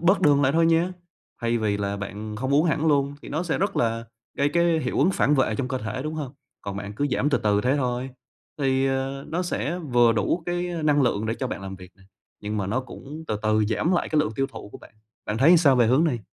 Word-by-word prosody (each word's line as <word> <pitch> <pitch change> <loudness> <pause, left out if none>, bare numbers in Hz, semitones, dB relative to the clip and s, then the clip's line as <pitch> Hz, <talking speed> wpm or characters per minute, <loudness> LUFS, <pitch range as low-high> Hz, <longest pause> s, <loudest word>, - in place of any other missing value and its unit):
bớt 185 +4 +3
đường 145 -1 +4
lại 135 0 +3
thôi 165 +1 +3
nha", 165 +2 +2 0.5
thay 115 0 0
vì 105 -2 0
là 100 0 -2
bạn 105 +1 -6
không 130 +4 -1
uống 150 +3 +4
hẳn 160 -1 +1
luôn 140 -2 +2
thì - - -9
nó 155 +4 -2
sẽ 175 - -1
rất 200 +3 -1
là 115 0 0 0.3
gây 140 +1 +3
cái 170 +1 +2
hiệu 125 - -2
ứng 160 +8 +4
phản 150 -5 +2
vệ 130 -5 +2
trong 130 +1 -2
cơ 130 0 -2
thể, 125 +3 -4
đúng 155 +2 -4
hông? 145 -5 -5 0.3
Còn 100 -1 -6
bạn 100 +1 -6
cứ 145 +7 0
giảm 140 +3 +1
từ - - +2
từ 105 -1 +2
thế 130 +5 +1
thôi, 125 -1 -2 0.5
thì, 135 -1 +1
ờ, 135 +1 -2
nó 170 +3 -1
sẽ 175 -1 -2
vừa 120 -8 +3
đủ 110 - 0
cái 175 0 -1 0.2
năng 145 -1 +3
lượng 110 -4 0
để 110 - -1
cho 130 - -3
bạn 115 - -5
làm 95 0 -7
việc 90 -1 -13
nè, 95 - -22 0.4
nhưng 105 +1 -3
mà 100 -2 -1
nó 115 +7 0
cũng 150 +4 -10
từ 105 - 0
từ 110 0 +2
giảm 110 - 0
lại 175 - 0
cái 155 - +1
lượng 150 - -1
tiêu 135 - +1
thụ 135 - -10
của - - -9
bạn. - - -17 0.3
Bạn 105 +1 -2
thấy 140 +6 +5
làm 175 - +7
sao 140 -5 +4
về 120 -2 +4
hướng 130 +7 +4
này? 140 -8 0
135 Hz, 270 wpm, -24 LUFS, 110-155 Hz, 0.5 s, làm